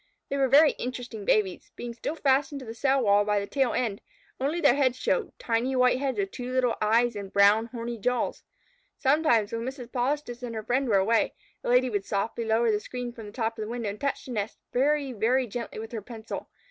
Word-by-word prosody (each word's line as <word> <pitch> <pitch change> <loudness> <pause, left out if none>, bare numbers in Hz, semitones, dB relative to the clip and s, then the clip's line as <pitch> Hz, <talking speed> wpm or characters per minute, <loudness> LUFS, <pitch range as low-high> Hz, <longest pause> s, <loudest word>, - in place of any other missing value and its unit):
They 280 - -1
were 270 -1 +3
very 290 +4 +7
interesting 245 -4 -5
babies. 195 -4 +1
Being 240 -1 -6
still 245 +6 -4
fastened 280 -1 +1
to - - -8
the 225 - -6
cell 265 +3 +2
wall 205 -1 +4
by 210 0 +1
the 200 - -3
tail 265 +2 +1
end, 220 -5 -1 0.4
only 290 +6 0
their 285 -7 +5
heads 260 -2 +2
showed, 460 - -1
tiny 240 +3 0
white 250 0 +4
heads 275 -1 -1
with 390 -1 -1
two 250 0 -6
little 255 -2 +2
eyes 230 +2 +3
and 200 -2 -6
brown, 205 +3 +5
horny 235 -1 -5
jaws. 250 +3 -1 0.6
Sometimes, 265 -7 +3
when 230 - -2
Mrs. 250 0 -6
Polistes 250 -1 -2
and 240 -2 -5
her 220 - -4
friend 255 +3 0
were 200 - +4
away, 220 +4 +2 0.3
the - - -4
Lady 250 +1 +4
would 205 -5 -1
softly 220 +3 -2
lower 225 +1 +3
the 210 - +1
screen 245 +2 -6
from 225 -3 -9
the - - -9
top 225 0 -2
of - - -2
the 215 - -4
window 235 -3 -3
and 210 - -11
touch 280 -1 -2
the 255 - -8
nest 210 -2 -3 0.2
very, 280 +1 +1
very 245 +4 +2
gently 235 +1 -6
with 220 +1 -6
her 225 -3 -4
pencil. 225 +1 -7
240 Hz, 225 wpm, -27 LUFS, 220-265 Hz, 0.6 s, very